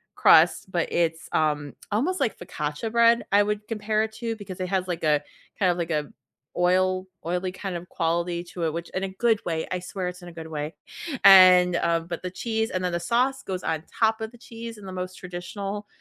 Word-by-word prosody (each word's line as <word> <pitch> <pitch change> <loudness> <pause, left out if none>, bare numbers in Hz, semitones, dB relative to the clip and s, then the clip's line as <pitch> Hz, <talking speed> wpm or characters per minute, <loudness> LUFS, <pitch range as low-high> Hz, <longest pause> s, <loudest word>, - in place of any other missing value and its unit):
crust, 170 +3 +5
but 170 -2 -1
it's, 165 -1 0
um, 150 -2 0 0.2
almost, 295 - 0
like, 225 - 0
focaccia 150 +5 -4
bread, 235 0 +5
I 205 +1 +6
would 210 0 -3
compare 215 -1 0
it 220 - -4
to 230 0 -4
because 195 -4 -9
it 185 - -2
has, 185 -1 0
like, 175 -2 -4
a, 150 -1 +3 0.4
kind 185 -3 +4
of, 175 - -3
like, 170 -1 -2
a 150 -2 -1 0.5
oil 185 +1 +2 0.2
oily 180 +2 -1
kind 185 0 -5
of 175 +1 -7
quality 170 +1 -1
to 175 0 -7
it, 160 - 0
which 170 +1 -5
in 190 - -3
a - - 0
good 220 +3 +1
way, 160 -2 -2
I 185 - -1
swear 180 +1 -4
it's 180 +1 -6
in 175 - -11
a - - -13
good 165 -1 -8
way. 150 0 -5 0.5
And, 185 -2 +8
um, 165 -1 +1
but 170 -1 -5
the 180 - -2
cheese 220 +3 -2
and 185 0 -2
then 180 - 0
the 170 - 0
sauce 250 +9 +1
goes 185 -1 -4
on 160 -1 -2 0.2
top 220 0 +3
of 220 0 -4
the 240 - -15
cheese 230 -1 -9
in 205 - -12
the 190 - -7
most 185 0 -5
traditional 195 +3 -6
185 Hz, 225 wpm, -25 LUFS, 170-210 Hz, 0.5 s, And